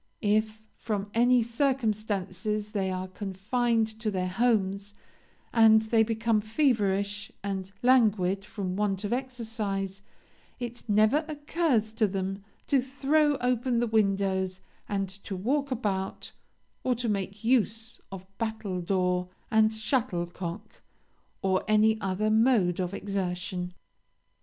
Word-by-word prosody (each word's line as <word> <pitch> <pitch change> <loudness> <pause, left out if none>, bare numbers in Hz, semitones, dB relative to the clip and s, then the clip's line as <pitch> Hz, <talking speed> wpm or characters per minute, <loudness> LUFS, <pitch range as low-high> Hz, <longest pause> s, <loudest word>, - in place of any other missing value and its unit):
If, 215 +1 +1
from 205 -2 -4
any 245 +1 +4
circumstances, 215 -5 -1
they 195 -3 -1
are 185 0 -3
confined 215 +5 0
to 220 -1 -1
their 185 -2 -1
homes, 200 -2 +1 0.6
and 220 -1 +6
they 220 0 +3
become 225 0 +1
feverish 205 -5 0
and 195 -1 -3
languid 210 -7 +3
from 195 -3 -4
want 200 -1 0
of 210 +3 -1
exercise, 220 -6 -3 0.6
it 240 -1 -5
never 215 +9 +4
occurs 295 -7 0
to 220 -1 +2
them 195 0 -3 0.2
to 275 -3 +3
throw 285 +3 +2
open 245 0 +1
the 240 - +2
windows 195 -4 +1 0.3
and 195 -1 -1
to 195 +1 -7
walk 275 +9 0
about, 200 -6 -2 0.5
or 255 - +2
to 240 +1 -3
make 200 0 -2
use 225 -1 +1
of 190 -1 -8
battledore 185 -5 -1 0.2
and 220 0 +5
shuttlecock, 200 -4 -3 0.6
or 190 -1 +2
any 215 +1 +4
other 195 +3 0
mode 220 -6 +3
of 180 -1 -1
exertion. 180 -2 -3
215 Hz, 120 wpm, -28 LUFS, 195-230 Hz, 0.6 s, and